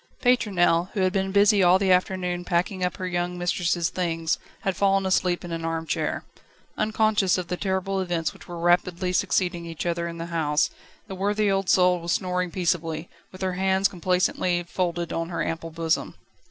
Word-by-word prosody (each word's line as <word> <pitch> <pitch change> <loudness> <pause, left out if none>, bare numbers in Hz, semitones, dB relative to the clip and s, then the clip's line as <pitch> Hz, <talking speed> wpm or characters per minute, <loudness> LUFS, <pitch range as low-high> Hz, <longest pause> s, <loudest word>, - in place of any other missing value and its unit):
Pétronelle, 190 -8 +3
who 195 - -1
had 185 0 +2
been 195 0 0
busy 205 +1 +5
all 180 0 +6
the 190 -1 +1
afternoon 180 -1 +1
packing 180 +2 -1
up 180 -1 -1
her 185 - -4
young 175 0 -2
mistress' 175 -1 0
things, 165 -3 -1 0.2
had 195 -1 -1
fallen 195 +1 +2
asleep 180 -2 +1
in 175 - -7
an 165 0 -4
arm 165 0 -2
chair. - - -2 0.5
Unconscious 215 -3 +2
of 180 -2 -4
the 180 - -1
terrible 190 +1 -1
events 175 -3 -1
which - - -15
were 175 - -7
rapidly 175 +1 +1
succeeding 180 -2 +1
each 165 +1 -5
other 170 0 -1
in 170 0 -6
the 165 - -4
house, 150 -2 +1 0.3
the 205 - -8
worthy 205 +2 +1
old 195 -1 0
soul 180 -1 +4
was 170 0 -1
snoring 180 -1 -1
peaceably, 170 -2 -1 0.2
with 185 0 -8
her 185 -1 0
hands 190 +1 +2
complacently 180 0 0
folded 175 -1 -2
on 165 0 -2
her 175 - -2
ample 165 0 -4
bosom. 165 0 -1
180 Hz, 185 wpm, -25 LUFS, 170-190 Hz, 0.5 s, all